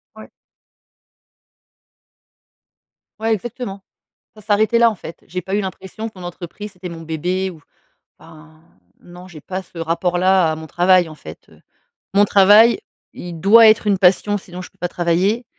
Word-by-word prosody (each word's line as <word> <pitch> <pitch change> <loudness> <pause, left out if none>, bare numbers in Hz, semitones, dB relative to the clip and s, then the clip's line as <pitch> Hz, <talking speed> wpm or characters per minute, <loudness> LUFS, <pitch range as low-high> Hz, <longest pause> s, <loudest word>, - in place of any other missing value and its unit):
Ouais. - - -13 2.9
Ouais, 225 0 0
exactement, 210 -2 -6 0.5
ça 215 - -15
s'arrêtait 215 +2 +2
là, 235 -1 +5
en 215 - -8
fait. 165 - -11
J'ai 180 +1 -5
pas 190 +1 -4
eu 210 - 0
l'impression 190 +3 -7
que 195 - -17
mon 180 - -10
entreprise, 180 +4 -9
c'était 180 0 -9
mon 165 -1 -9
bébé 180 +4 -3
ou 160 -4 -13 0.6
ben, 160 0 -17 0.4
non, 180 +1 -14
j'ai 165 -4 -12
pas 190 0 -5
ce 180 - -23
rapport 170 +2 -1
là 185 -2 +3
à - - -5
mon 160 0 -9
travail, 175 +1 +3
en - - -10
fait, 80 - -13
heu, - - -21 0.5
mon 205 +1 +5
travail, 205 - +5 0.3
il 175 -2 -8
doit 220 +5 +7
être 215 0 +3
une 200 -2 +2
passion, 195 +2 +2
sinon, 180 -1 -10
je - - -12
peux - - -36
pas 175 - -3
travailler 180 +7 0
185 Hz, 170 wpm, -19 LUFS, 175-205 Hz, 2.9 s, doit